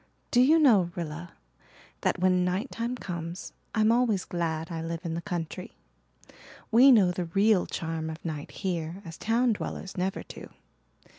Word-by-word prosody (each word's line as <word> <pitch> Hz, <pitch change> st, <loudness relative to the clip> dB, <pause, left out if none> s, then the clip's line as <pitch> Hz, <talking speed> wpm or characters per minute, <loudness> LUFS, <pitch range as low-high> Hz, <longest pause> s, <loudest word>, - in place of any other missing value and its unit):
Do 245 Hz, -, +5 dB
you 300 Hz, +6 st, +6 dB
know, 220 Hz, -, +5 dB
Rilla, 170 Hz, 0 st, -6 dB, 0.7 s
that -, -, +1 dB
when 180 Hz, 0 st, +3 dB
night 185 Hz, +8 st, -1 dB
time 235 Hz, +2 st, -3 dB
comes 175 Hz, -4 st, -6 dB, 0.2 s
I'm 215 Hz, 0 st, +4 dB
always 230 Hz, -5 st, +2 dB
glad 165 Hz, -1 st, -3 dB
I 165 Hz, -1 st, -3 dB
live 165 Hz, 0 st, -4 dB
in 165 Hz, -, -2 dB
the 170 Hz, -, -3 dB
country. 170 Hz, -2 st, -5 dB, 1.0 s
We 255 Hz, +5 st, +8 dB
know 200 Hz, -7 st, +6 dB
the 180 Hz, 0 st, -3 dB
real 195 Hz, +3 st, +3 dB
charm 160 Hz, -1 st, -3 dB
of 160 Hz, +2 st, -8 dB
night 155 Hz, -3 st, -4 dB
here 175 Hz, 0 st, -4 dB
as 165 Hz, -1 st, -8 dB
town 235 Hz, +2 st, +2 dB
dwellers 195 Hz, -2 st, -6 dB
never 185 Hz, +1 st, -1 dB
do. -, -, -10 dB
180 Hz, 160 wpm, -28 LUFS, 165-220 Hz, 1.0 s, We